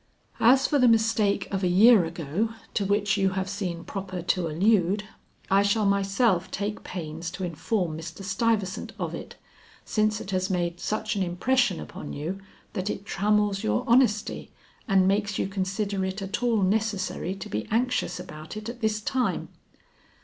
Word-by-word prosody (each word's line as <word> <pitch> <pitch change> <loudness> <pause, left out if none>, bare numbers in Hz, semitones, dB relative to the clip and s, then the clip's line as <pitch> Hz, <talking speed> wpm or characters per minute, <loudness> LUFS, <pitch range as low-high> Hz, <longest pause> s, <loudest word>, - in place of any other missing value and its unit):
"As 260 +4 +5
for 290 - +2
the 250 - +6
mistake 220 -3 +2
of 195 0 -1
a - - +3
year 200 +2 +6
ago 165 +6 -2 0.2
to 200 - 0
which 205 +1 +1
you 195 -1 +3
have 190 0 -1
seen 185 -4 -4
proper 185 -1 -5
to 180 -1 0
allude, 195 +4 +2 0.5
I 195 +1 +6
shall 205 +1 +2
myself 195 -1 +2
take 205 +1 -3
pains 165 -1 -5
to 185 +2 -6
inform 170 0 -2
Mr. 170 +4 -8
Stuyvesant 195 0 -1
of - - -3
it, - - -7 0.5
since 215 -2 +1
it 195 - -7
has 185 0 0
made 175 -2 -1
such 215 +2 -2
an 200 - -1
impression 190 +4 +1
upon - - -7
you 165 +7 -4 0.3
that 190 -1 -2
it 200 - -4
trammels 205 0 +1
your 105 +1 +1
honesty 235 -4 +2 0.4
and 190 -2 +4
makes 200 0 +1
you - - 0
consider 195 +1 -2
it 190 +2 -3
at 195 +3 -3
all 230 -4 +2
necessary 195 -2 0
to 195 - -7
be 105 +1 -3
anxious 245 -3 0
about 160 +1 -8
it 215 +1 -6
at 240 +1 -8
this 215 -1 0
time." 235 -5 -1
195 Hz, 170 wpm, -26 LUFS, 180-215 Hz, 0.5 s, the